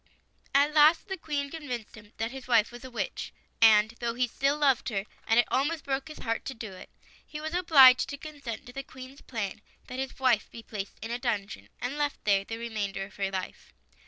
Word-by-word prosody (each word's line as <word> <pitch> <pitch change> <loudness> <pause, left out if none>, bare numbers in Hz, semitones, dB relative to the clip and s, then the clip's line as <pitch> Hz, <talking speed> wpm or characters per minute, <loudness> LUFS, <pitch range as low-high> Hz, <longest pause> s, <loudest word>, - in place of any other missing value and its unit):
At 285 +2 +4
last 310 +6 +5
the 385 - -1
Queen 290 -5 -3
convinced 255 -9 -6
him 210 -1 -15
that 225 +1 -2
his 265 -1 -9
wife 230 -3 +4
was 240 +1 -11
a 260 - -8
witch; 240 - -4 0.3
and 215 -1 +7
though 235 -1 -2
he 250 0 +1
still 275 +4 0
loved 275 -5 +2
her, 195 -3 -2 0.2
and 225 +1 +5
it 240 - +4
almost 300 +3 +1
broke 270 +1 -2
his 310 - -9
heart 230 0 -2
to 270 - -5
do 220 -4 -7
it, 185 - -11 0.3
he 300 - -8
was 315 +1 -5
obliged 280 -8 +7
to 285 - -5
consent 280 -7 -7
to 245 - -11
the 275 - -4
Queen's 260 +1 -12
plan 220 -3 -4 0.2
that 255 - -7
his 265 0 -4
wife 255 -5 +2
be 230 - -10
placed 200 -3 -6
in 225 - -5
a 240 - -2
dungeon, 200 - -3
and 265 +4 -3
left 290 -1 -1
there 200 -2 +3
the 225 +3 -6
remainder 210 -4 -3
of 195 - -16
her 195 -1 0
life. 190 -1 -6
245 Hz, 220 wpm, -29 LUFS, 220-280 Hz, 0.3 s, and